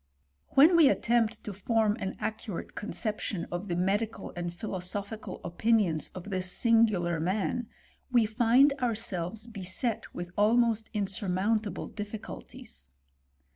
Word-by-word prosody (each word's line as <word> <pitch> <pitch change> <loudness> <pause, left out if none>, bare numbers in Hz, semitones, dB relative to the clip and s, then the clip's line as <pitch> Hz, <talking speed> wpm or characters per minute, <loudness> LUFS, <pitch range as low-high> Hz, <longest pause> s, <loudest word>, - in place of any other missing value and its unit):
When 310 +6 +8
we 320 -5 +7
attempt 230 -4 +1
to 210 - -5
form 215 +2 +1
an 190 - -4
accurate 215 -4 -4
conception 210 -3 -3
of 175 +3 -4
the 175 - -1
medical 205 +5 -1
and 175 0 -3
philosophical 195 +2 -5
opinions 175 -2 +1
of 185 +2 -7
this 185 -1 -1
singular 215 -8 +3
man, 195 +7 -1 0.4
we 240 -3 +5
find 240 +6 +4
ourselves 220 -4 -2
beset 220 +1 -2
with 175 0 -6
almost 225 +1 +3
insurmount 205 +1 0
able 195 - -5
difficulties. 205 - -8
210 Hz, 120 wpm, -29 LUFS, 185-225 Hz, 0.4 s, When